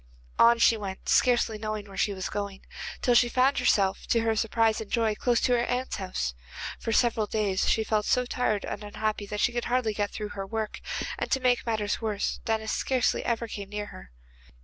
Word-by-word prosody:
On 235 0 +7
she 230 0 +5
went, 195 -2 -7
scarcely 240 -3 +3
knowing 215 -1 -4
where 195 - -11
she 205 - +1
was 190 -2 -4
going, 200 -1 -5 0.4
till 245 - +4
she 240 0 +5
found 260 +3 +3
herself, 200 -6 +2
to 230 - +2
her 225 -1 +1
surprise 225 0 +1
and 215 - -8
joy, 225 -2 +1
close 240 +2 +1
to - - +2
her 240 -1 +3
aunt's 250 +1 -2
house. 185 - -3 0.5
For 225 - -3
several 225 -2 +2
days 205 -3 0
she 220 - +2
felt 215 -1 0
so 250 0 +2
tired 245 -4 -1
and 210 - -5
unhappy 210 0 -3
that 210 0 -3
she - - +3
could 240 -1 -2
hardly 240 -3 +1
get 205 -1 -1
through 210 -1 -5
her 195 -1 -6
work, 220 0 -4 0.4
and - - -2
to 265 - +2
make 250 -2 +1
matters 215 -2 -1
worse 215 -2 -1
Denis 220 -1 -1
scarcely 255 -2 +1
ever 235 0 -1
came 200 -3 -7
near 210 0 -4
her. - - -12
220 Hz, 210 wpm, -27 LUFS, 205-235 Hz, 0.5 s, On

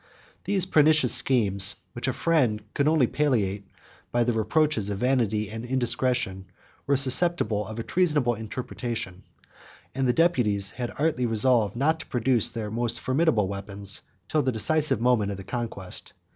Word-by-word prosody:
99 - - -28 0.3
These 195 -2 +3
pernicious 150 -6 +4
schemes, 100 -6 +3 0.2
which 120 +2 -5
a - - +2
friend 130 -11 +1
could 140 - +1
only 155 -4 +4
palliate 105 -9 -1 0.4
by 120 0 +2
the 120 0 0
reproaches 110 0 +1
of 100 - -3
vanity 110 -3 0
and 110 +1 -6
indiscretion, 125 -5 -1 0.4
were 140 -1 +3
susceptible 130 - +2
of 110 0 -8
a 115 - -3
treasonable 150 -9 +1
interpretation; 110 -3 -6 0.7
and 135 0 -1
the 125 - +2
deputies 115 - +1
had 120 -2 -5
artfully 145 -5 0
resolved 115 -1 +2
not 155 +6 +1
to 155 - -9
produce 120 -2 +1
their 110 -2 -5
most 120 +1 0
formidable 130 - +1
weapons 100 0 -3 0.3
till 155 - +1
the 130 - 0
decisive 150 +4 +2
moment 120 -4 +2
of 100 - -4
the 95 - -8
contest. 110 -4 -6
120 Hz, 160 wpm, -25 LUFS, 105-140 Hz, 0.7 s, pernicious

